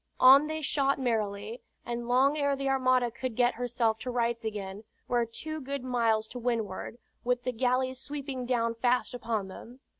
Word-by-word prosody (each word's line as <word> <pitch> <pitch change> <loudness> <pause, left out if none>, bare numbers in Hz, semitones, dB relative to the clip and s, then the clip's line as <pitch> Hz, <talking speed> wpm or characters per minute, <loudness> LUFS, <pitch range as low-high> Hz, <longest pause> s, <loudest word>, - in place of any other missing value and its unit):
On 270 +4 +8
they 315 0 -4
shot 275 -1 +2
merrily, 220 -2 -2 0.2
and 235 0 -4
long 265 +4 +4
ere 285 -2 +1
the 275 0 -3
armada 255 -2 +2
could 255 0 -4
get 245 0 +3
herself 235 -2 0
to 255 - -5
rights 235 -1 0
again, 205 -2 -5 0.2
were 240 -1 +1
two 310 +7 -5
good 275 0 -4
miles 230 -4 +1
to 250 - -6
windward, 230 -3 -2 0.3
with 245 0 0
the 255 - -1
galleys 255 +2 0
sweeping 270 -3 -5
down 230 -2 +1
fast 245 +2 +1
upon 225 -5 -2
them. 235 +6 -11
245 Hz, 175 wpm, -29 LUFS, 230-260 Hz, 0.3 s, On